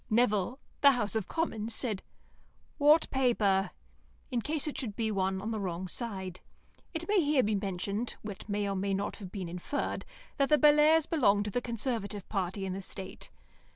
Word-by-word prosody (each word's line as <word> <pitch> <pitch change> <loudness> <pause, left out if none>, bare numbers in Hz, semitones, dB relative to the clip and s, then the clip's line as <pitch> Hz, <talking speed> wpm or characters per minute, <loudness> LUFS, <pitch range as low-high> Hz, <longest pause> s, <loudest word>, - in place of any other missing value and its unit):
Nevill 215 0 +2 0.2
(the 280 -1 +8
House 215 -4 -1
of 220 -4 -1
Commons) 225 -9 -2
said, 215 -7 0 0.8
"What 300 +3 +6
paper?" 205 -8 +2 0.6
in 245 -2 0
case 305 +3 -1
it 300 - -3
should 215 -6 -4
be 220 -1 -1
one 190 -1 0
on 215 +4 -3
the 220 - -2
wrong 185 -1 -3
side. 190 -4 -4 0.5
It 335 0 -5
may 410 -2 +4
here 290 -4 +3
be 215 - +1
mentioned 200 +3 -2
(what 210 0 -7
may 205 0 0
or 195 - -1
may 195 +1 0
not 200 +1 -3
have 190 -4 -9
been 190 -4 -4
inferred) 180 +11 -3 0.3
that 275 -1 +2
the 300 - +6
Bellairs' 300 +1 +6
belonged 205 - +3
to 210 - -3
the 245 - 0
Conservative 225 -4 -3
party 195 -1 -2
in 190 - -2
the 195 - -4
state. 190 0 -7
215 Hz, 185 wpm, -31 LUFS, 195-265 Hz, 0.8 s, the